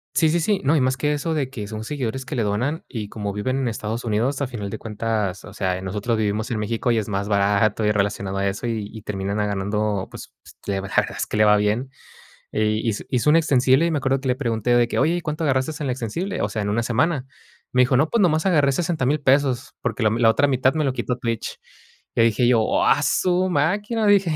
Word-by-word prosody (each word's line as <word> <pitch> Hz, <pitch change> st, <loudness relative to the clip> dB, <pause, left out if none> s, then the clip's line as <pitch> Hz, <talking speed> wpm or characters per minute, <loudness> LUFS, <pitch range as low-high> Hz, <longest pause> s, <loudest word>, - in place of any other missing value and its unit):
Sí, 160 Hz, -, +4 dB
sí, 170 Hz, +2 st, +2 dB
sí. 200 Hz, +4 st, +1 dB
No, 140 Hz, +4 st, +3 dB
y 145 Hz, -, +3 dB
más 130 Hz, +1 st, +1 dB
que 150 Hz, +3 st, 0 dB
eso 160 Hz, +3 st, -2 dB
de 135 Hz, -4 st, -1 dB
que 105 Hz, -6 st, -6 dB
son 110 Hz, 0 st, -6 dB
seguidores 130 Hz, -1 st, -4 dB
que 145 Hz, -, -5 dB
le 120 Hz, -, 0 dB
donan 125 Hz, +11 st, -1 dB
y 110 Hz, -4 st, -5 dB
como 100 Hz, -1 st, -5 dB
viven 130 Hz, +6 st, -2 dB
en 130 Hz, -, -1 dB
Estados 110 Hz, +1 st, -3 dB
Unidos, 120 Hz, +6 st, 0 dB
a 140 Hz, -, 0 dB
final 110 Hz, -5 st, -5 dB
de 110 Hz, -, -5 dB
cuentas, 105 Hz, -3 st, -3 dB
o 100 Hz, -, -11 dB
sea, 95 Hz, -3 st, -1 dB
eh, -, -, -7 dB
nosotros 105 Hz, +4 st, -2 dB
vivimos 105 Hz, +1 st, -1 dB
en 115 Hz, -, -2 dB
México 115 Hz, +3 st, -1 dB
y 115 Hz, -, +2 dB
es 110 Hz, -, -1 dB
más 100 Hz, -1 st, -2 dB
barato 100 Hz, +1 st, +2 dB
y 105 Hz, -, +3 dB
relacionado 100 Hz, -1 st, -1 dB
a 100 Hz, -, 0 dB
eso 100 Hz, +4 st, -3 dB
y 110 Hz, -3 st, -3 dB
y 110 Hz, -, -9 dB
termina 100 Hz, -1 st, -3 dB
ella 105 Hz, 0 st, 0 dB
ganando, 100 Hz, 0 st, -1 dB
pues -, -, -10 dB
pues, -, -, -17 dB
la 100 Hz, -1 st, -1 dB
verdad 95 Hz, -, +1 dB
es -, -, -3 dB
que -, -, -3 dB
le 110 Hz, -, +5 dB
va 105 Hz, 0 st, +6 dB
bien. 110 Hz, +6 st, 0 dB, 0.6 s
Y 110 Hz, +1 st, 0 dB
hiz 105 Hz, -, -2 dB
hizo 130 Hz, +4 st, +2 dB
un 160 Hz, -, +6 dB
extensible 135 Hz, -1 st, +3 dB
y -, -, 0 dB
me 155 Hz, -, 0 dB
acuerdo 135 Hz, 0 st, 0 dB
que 135 Hz, -, -3 dB
le 125 Hz, -, +1 dB
pregunté 120 Hz, -2 st, 0 dB
de 120 Hz, -1 st, +3 dB
que: -, -, -2 dB
"Oye 165 Hz, +2 st, +3 dB
¿y -, -, -2 dB
cuánto 155 Hz, +1 st, -3 dB
agarraste 130 Hz, +1 st, +1 dB
en 140 Hz, -, -2 dB
el -, -, 0 dB
extensible?", 135 Hz, -, -3 dB
o -, -, 0 dB
sea, 110 Hz, -, -3 dB
en 100 Hz, -, -2 dB
una 115 Hz, +3 st, 0 dB
semana. 130 Hz, +4 st, 0 dB, 0.5 s
Me 125 Hz, -, +5 dB
dijo: 125 Hz, 0 st, +3 dB
"No, 150 Hz, +4 st, +3 dB
pues 235 Hz, -, +2 dB
nomás 160 Hz, -5 st, +3 dB
agarré 145 Hz, -7 st, +3 dB
$60000 155 Hz, -3 st, 0 dB
pesos, 135 Hz, -1 st, +1 dB
porque 120 Hz, -1 st, -2 dB
la 110 Hz, -, +4 dB
m 115 Hz, +2 st, -1 dB
la 115 Hz, -, +5 dB
otra 145 Hz, +5 st, +3 dB
mitad 130 Hz, +1 st, +2 dB
me 155 Hz, -1 st, 0 dB
lo 135 Hz, -, +1 dB
quitó 125 Hz, -1 st, -2 dB
Twitch. 115 Hz, -2 st, -3 dB, 0.6 s
Le 115 Hz, -, +4 dB
dije 115 Hz, +2 st, +2 dB
yo: 120 Hz, -2 st, +4 dB
"¡Oh, 110 Hz, -, +1 dB
a -, -, +3 dB
su 185 Hz, 0 st, +2 dB
máquina!", 205 Hz, +8 st, 0 dB
dije. 195 Hz, -5 st, +4 dB
120 Hz, 260 wpm, -22 LUFS, 105-145 Hz, 0.6 s, va